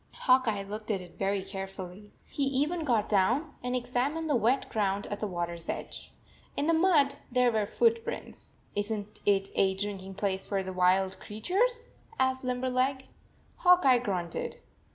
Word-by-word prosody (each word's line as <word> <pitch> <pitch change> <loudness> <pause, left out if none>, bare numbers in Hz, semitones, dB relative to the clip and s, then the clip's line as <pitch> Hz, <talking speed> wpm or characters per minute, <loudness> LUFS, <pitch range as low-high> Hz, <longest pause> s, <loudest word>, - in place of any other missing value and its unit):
Hawk 255 -1 +4
Eye 205 -3 0
looked 215 +2 -7
at 205 -3 +1
it 180 -1 -13
very 195 0 0
carefully. 195 0 -7
He - - -6
even 295 +5 0
got 230 -6 +2
down 240 - +2
and 250 0 -2
examined 255 +6 -1
the - - +4
wet 245 +3 +2
ground 200 -2 0
at 205 - -3
the 215 - -2
water 175 -2 -3
s 170 -1 -10
edge. - - -5 0.5
In 285 - +1
the 330 - +3
mud 320 -5 +4 0.2
there 250 -1 +4
were 215 -2 0
foot 460 - +2
prints. - - -7
" - - -33
Is 205 +1 -1
n 210 -2 -2
t - - -14
it 195 -1 +1
a 190 -1 +2
drinking 195 -1 -4
place 190 -1 -1
for 195 -2 -2
the 185 0 -5
wild 185 +1 +2
creatures?" 425 - -1 0.3
asked 260 0 +1
Limberleg. 255 +1 0 0.5
Hawk 360 -2 +5
Eye 255 -2 +6
grunted. 180 -8 -3
220 Hz, 180 wpm, -29 LUFS, 195-265 Hz, 0.5 s, Eye